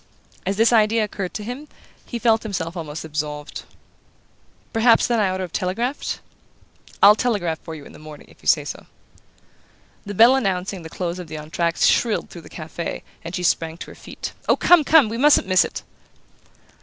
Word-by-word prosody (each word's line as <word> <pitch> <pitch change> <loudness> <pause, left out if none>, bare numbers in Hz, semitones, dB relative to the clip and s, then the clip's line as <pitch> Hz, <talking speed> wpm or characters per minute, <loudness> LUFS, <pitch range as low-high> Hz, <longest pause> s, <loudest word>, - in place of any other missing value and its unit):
As 195 +1 -1
this 225 +2 +4
idea 220 0 +4
occurred 195 -3 -4
to 210 - -4
him 250 +7 -7 0.4
he 240 - -4
felt 225 -1 +3
himself 180 -5 -4
almost 160 -2 -6
absolved. 150 -1 -5 1.1
"Perhaps, 225 0 +4
then, 235 -2 +1
I 200 -3 +2
ought 185 - -2
to 190 - -3
have 180 - -7
telegraphed?" 230 - -2 0.8
"I'll 205 +1 +10
telegraph 205 -8 -1
for 160 - -8
you 145 -2 -11
in - - -13
the - - -13
morning 155 -1 -12
if - - -21
you - - -10
say - - +4
so." - - -7 1.2
The 205 0 -7
bell 235 +6 +7
announcing 190 -5 -1
the 160 - -9
close 175 +1 -4
of 180 - -7
the 155 - -8
entr' 155 +3 -7
acte 170 0 +1
shrilled 230 -3 +2
through 170 - -9
the - - -14
cafe, 160 +1 -6 0.2
and 170 +2 -6
she 180 - -3
sprang 165 -1 0
to - - -9
her - - -13
feet. - - -8 0.2
"Oh, - - +6
come, 350 -3 +5
come! 295 -3 +5
We 230 +2 -4
mustn't 295 -4 +5
miss 185 0 +4
it!" - - -6
190 Hz, 195 wpm, -22 LUFS, 165-225 Hz, 1.2 s, I'll